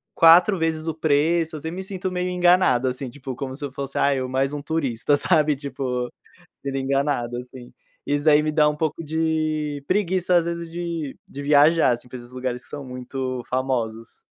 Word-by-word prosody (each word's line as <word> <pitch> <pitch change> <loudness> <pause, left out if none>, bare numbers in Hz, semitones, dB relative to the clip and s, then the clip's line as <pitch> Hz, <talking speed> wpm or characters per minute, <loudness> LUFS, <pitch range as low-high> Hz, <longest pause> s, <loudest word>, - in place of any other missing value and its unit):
4 175 +4 +6
vezes 160 0 -1
o 160 - 0
preço. 160 +1 +1
Eu - - -5
sempre 165 +2 -5
me 190 - -4
sinto 190 -1 -4
meio 180 0 -2
enganado 175 -8 +3
assim, 130 +1 -3
tipo 130 0 -7
como 130 0 -5
se 145 - -9
eu 140 - -6
fosse, 140 0 -6
ah, 140 - +3
eu 130 -1 -2
mais 135 +2 0
um 145 - -4
turista, 145 -3 0
sabe 150 -3 +4
tipo 130 -3 -3 0.6
sendo 140 -1 -3
enganado 135 -3 0
assim. 125 0 -10 0.3
Isso 145 +1 0
daí 150 -1 +5
me 155 - 0
dá 150 0 +3
um 150 - 0
pouco 160 +1 -2
de 155 -2 -1
preguiça, 185 -2 +1
às 170 - +3
vezes 170 0 -3
de 170 -4 -4
de 140 - -7
viajar, 150 +2 +5
assim, 120 +1 -5
pra 130 - -8
esses 120 0 -12
lugares 125 -1 -4
que - - -14
são 145 - -6
muito 130 0 -5
famosos. 120 -4 -2
145 Hz, 195 wpm, -23 LUFS, 130-165 Hz, 0.6 s, 4